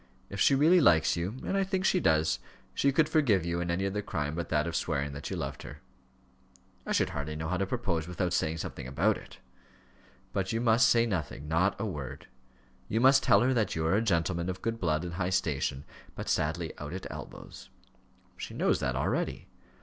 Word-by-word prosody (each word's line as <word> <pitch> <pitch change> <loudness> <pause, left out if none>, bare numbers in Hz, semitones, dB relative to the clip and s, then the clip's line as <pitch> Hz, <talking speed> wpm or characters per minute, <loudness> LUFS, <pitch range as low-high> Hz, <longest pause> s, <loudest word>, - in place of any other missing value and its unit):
If 100 - -5
she 140 - +5
really 165 +6 +5
likes 80 - +4
you 90 +6 -3
and - - -1
I 195 - +2
think 190 0 -1
she 185 - +3
does 80 - +2 0.3
she 140 - +2
could 150 +3 +3
forgive 130 - +2
you 85 0 -1
any 85 +2 -1
other 100 +2 -1
crime 75 -6 -3
but 85 +1 -4
that 75 0 +1
of 85 -1 -3
swearing 70 -3 -1
that 70 - -6
you - - -3
loved 70 -1 -4
her." - - -10 1.1
"I - - -2
should - - +1
hardly 75 +1 -4
know 80 +1 -4
how 90 - 0
to 100 +1 -1
propose 90 -9 -2
without 90 0 -2
saying 80 -2 0
something 70 - -6
about 90 +12 +2
it." - - -12 1.0
"But 95 +2 -1
you 115 - 0
must 115 +2 +4
say 115 0 +4
nothing 80 -8 -3
not 85 +5 +1
a - - -1
word; 75 -10 -6 0.6
you 110 - 0
must 135 +2 +6
tell - - +5
her 130 +2 +3
that 110 -6 0
you 80 -1 -1
are 80 - +2
a 105 - +3
gentleman 85 -3 0
of 95 - -5
good 115 0 -2
blood 80 -4 0
and 85 -1 -5
high 90 +1 -1
station, 75 -7 -1 0.3
but - - -6
sadly 80 +2 -1
out 75 +2 -6
at 95 - -6
elbows." - - -10 0.7
"She - - -7
knows - - +2
that - - -1
already." - - -2
90 Hz, 210 wpm, -29 LUFS, 80-115 Hz, 1.1 s, must